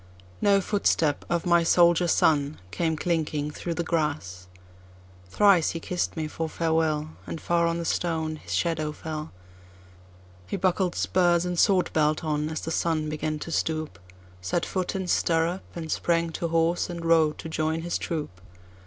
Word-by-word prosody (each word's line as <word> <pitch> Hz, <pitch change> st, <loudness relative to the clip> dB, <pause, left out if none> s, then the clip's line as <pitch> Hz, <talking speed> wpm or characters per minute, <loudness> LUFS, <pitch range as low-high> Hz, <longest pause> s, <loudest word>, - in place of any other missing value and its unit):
No 200 Hz, -1 st, +4 dB
footstep 165 Hz, -7 st, +1 dB
of 170 Hz, -1 st, 0 dB
my 170 Hz, -1 st, +4 dB
soldier 175 Hz, +1 st, +4 dB
son 150 Hz, -3 st, +2 dB
came 160 Hz, +9 st, -1 dB
clinking 155 Hz, -3 st, -1 dB
through 170 Hz, +2 st, -4 dB
the 170 Hz, -, -1 dB
grass. 145 Hz, -, -2 dB, 0.8 s
Thrice 195 Hz, -, +4 dB
he -, -, -5 dB
kiss'd 175 Hz, 0 st, -3 dB
me 155 Hz, -1 st, -2 dB
for 160 Hz, +1 st, -4 dB
farewell, 160 Hz, -1 st, 0 dB, 0.2 s
And 165 Hz, -, -5 dB
far 170 Hz, 0 st, +1 dB
on 170 Hz, 0 st, 0 dB
the 170 Hz, -, -4 dB
stone 160 Hz, -2 st, -1 dB
his -, -, -11 dB
shadow 155 Hz, -3 st, -1 dB
fell; 155 Hz, 0 st, -6 dB, 1.2 s
He -, -, -3 dB
buckled 185 Hz, -1 st, +1 dB
spurs 175 Hz, -1 st, +2 dB
and 180 Hz, -1 st, -2 dB
sword 190 Hz, -2 st, +3 dB
belt 155 Hz, 0 st, +2 dB
on, 150 Hz, -1 st, -1 dB
as 160 Hz, -, -4 dB
the 160 Hz, -, -4 dB
sun 160 Hz, -2 st, 0 dB
began 155 Hz, 0 st, -2 dB
to 165 Hz, -, -7 dB
stoop, 155 Hz, -, -2 dB, 0.4 s
Set 95 Hz, -, -1 dB
foot 185 Hz, -1 st, -2 dB
in 190 Hz, -1 st, -2 dB
stirrup, 170 Hz, +1 st, +1 dB
and 160 Hz, -2 st, -5 dB
sprang 170 Hz, -1 st, +1 dB
to 170 Hz, -, -3 dB
horse, 165 Hz, +2 st, +1 dB
and 170 Hz, -1 st, -6 dB
rode 160 Hz, -2 st, +3 dB
to -, -, -7 dB
join 160 Hz, 0 st, -1 dB
his 175 Hz, -, -2 dB
troop. 150 Hz, -, -4 dB
165 Hz, 165 wpm, -26 LUFS, 155-170 Hz, 1.2 s, No